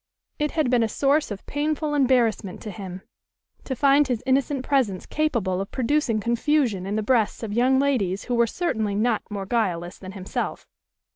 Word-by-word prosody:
It 300 0 +1
had 300 -6 +2
been 245 -2 +4
a 225 - +1
source 285 +6 +2
of 205 -2 -7
painful 300 +1 -1
embarrassment 240 -8 +2
to 215 - -5
him, 185 -1 -8 0.6
to 265 - -3
find 280 +2 +4
his 245 -4 -2
innocent 265 0 +1
presence 240 -10 +1
capable 225 -12 0
of 195 - -5
producing 260 -3 0
confusion 235 -3 +1
in 205 - -2
the 215 - 0
breasts 230 -1 +1
of 210 -2 -4
young 255 +4 +3
ladies 225 -9 +1
who 250 - -3
were 235 -1 +3
certainly 220 - -1
not 220 +1 +1
more 200 -2 -4
guileless 180 -6 -1
than 190 0 -9
himself. 190 -1 -4
235 Hz, 180 wpm, -24 LUFS, 200-275 Hz, 0.6 s, been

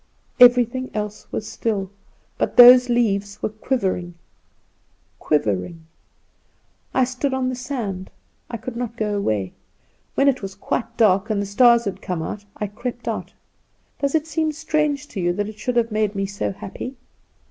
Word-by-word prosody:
Everything 245 +1 +5
else 210 -1 -5
was 215 - -4
still; 200 -4 -2 0.5
but - - -1
those 250 +1 +9
leaves 205 -4 0
were - - +1
quivering, 195 -6 -2 1.0
quivering. 150 - -1 1.1
I 260 - +3
stood 260 +2 -1
on 255 -1 0
the 255 - -3
sand; 235 -8 -4 0.4
I 235 - -4
could 230 +2 -7
not 235 -1 -4
go 210 -2 -1
away. 105 - -1 0.6
When 275 - +3
it 270 -2 +2
was 195 -1 -6
quite 230 +3 -3
dark, 200 -1 +3
and 210 -2 0
the 200 - -1
stars 235 +3 +5
had 200 - -4
come, 175 -3 -3 0.3
I 210 - -3
crept 240 +4 -6
out. - - -4 0.7
Does 280 +2 0
it 310 -1 +1
seem 315 0 -1
strange 300 -2 -1
to 205 - -6
you 175 -1 +1
that 205 +3 -2
it 215 0 -12
should 250 +3 -2
have 235 -1 +2
made 215 -1 0
me 195 0 -1
so 200 +1 -3
happy? 200 +7 -7
225 Hz, 160 wpm, -22 LUFS, 200-255 Hz, 1.1 s, those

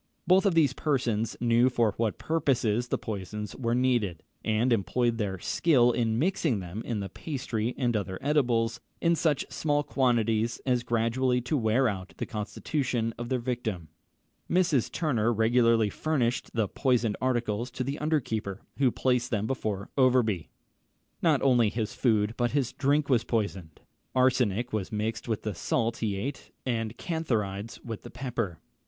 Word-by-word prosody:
Both 190 +2 +5
these 150 -5 +4
persons 120 -8 -1
knew 120 +1 +4
for 115 -4 +1
what 110 -2 -1
purposes 125 -7 +1
the - - 0
poisons 105 0 -5
were 115 -2 0
needed, 120 -9 +1 0.2
and 110 +3 +2
employed 115 +4 +1
their 100 -3 -1
skill 125 - +3
in 115 -2 0
mixing 155 - +1
them 95 +4 -6
in 110 -4 -3
the 100 - -3
pastry 125 - -3
and 120 -3 +1
other 95 -3 -2
edibles, 120 -6 +1 0.2
in 170 0 +3
such 150 -4 +1
small 145 -1 0
quantities 115 -5 +1
as 125 -2 +2
gradually 120 +2 +1
to 125 +6 -1
wear 120 +1 +2
out 95 -3 -4
the - - -3
constitution 115 +1 -2
of 120 0 -4
their 130 - +1
victim. 115 -9 -3 0.6
Mrs. 170 -8 +2
Turner 120 -9 +1
regularly 115 -1 +3
furnished 130 -6 0
the 110 -3 +2
poisoned 120 -2 +1
articles 120 -2 0
to 130 +1 -4
the 140 +4 -3
under 155 +1 +2
keeper, 105 -6 -4 0.2
who 135 -2 +5
placed 125 0 0
them 105 -2 0
before 110 -5 -3
Overbury. 120 -9 +3 0.7
Not - - +3
only 120 -5 +4
his 110 0 -3
food 110 -3 +2
but 120 -1 0
his 140 -4 0
drink 145 +1 +1
was 120 -4 +3
poisoned. 100 -9 -3 0.3
Arsenic 125 -3 +2
was 105 0 -2
mixed 110 +1 -2
with 110 -3 -2
the 105 - -2
salt 115 +6 -1
he 105 -3 -1
ate, 135 +9 -5 0.2
and 115 -2 -2
cantharides 115 - -2
with 115 -3 -5
the - - -10
pepper. 115 -8 -3
120 Hz, 160 wpm, -28 LUFS, 110-130 Hz, 0.7 s, Both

